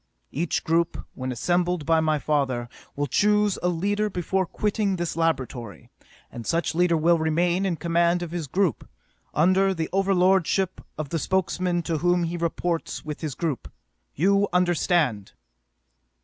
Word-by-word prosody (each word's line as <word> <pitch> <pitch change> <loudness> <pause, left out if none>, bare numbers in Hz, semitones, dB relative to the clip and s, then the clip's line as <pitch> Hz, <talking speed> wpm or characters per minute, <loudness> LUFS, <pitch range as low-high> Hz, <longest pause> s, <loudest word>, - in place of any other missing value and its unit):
Each 165 +2 -1
group, 165 +1 0
when 130 0 -4
assembled 175 +4 0
by 165 +1 +3
my 155 -1 +2
father, 135 -5 -1 0.3
will 145 - -1
choose 210 - +2
a 180 - +1
leader 205 +5 0
before 185 0 -1
quitting 210 -1 -1
this 175 -2 -3
laboratory, 130 -9 -2 0.4
and 120 - -7
such 170 +1 0
leader 170 0 +3
will 165 +2 +3
remain 175 +4 +1
in 175 - 0
command 170 +1 +1
of 170 - -6
his 170 -4 -4
group, 175 - 0 0.5
under 185 +5 +3
the 160 -2 -3
overlordship 190 -1 +2 0.2
of 150 -2 -4
the 165 - -1
Spokesman 180 -1 0
to 165 -2 -2
whom 175 +1 +2
he 170 +1 -2
reports 170 -1 -2
with 150 -1 -6
his 150 -5 -4
group. 155 -7 -3 0.4
You 200 +5 +3
understand! 175 - +1
170 Hz, 150 wpm, -25 LUFS, 155-185 Hz, 0.5 s, by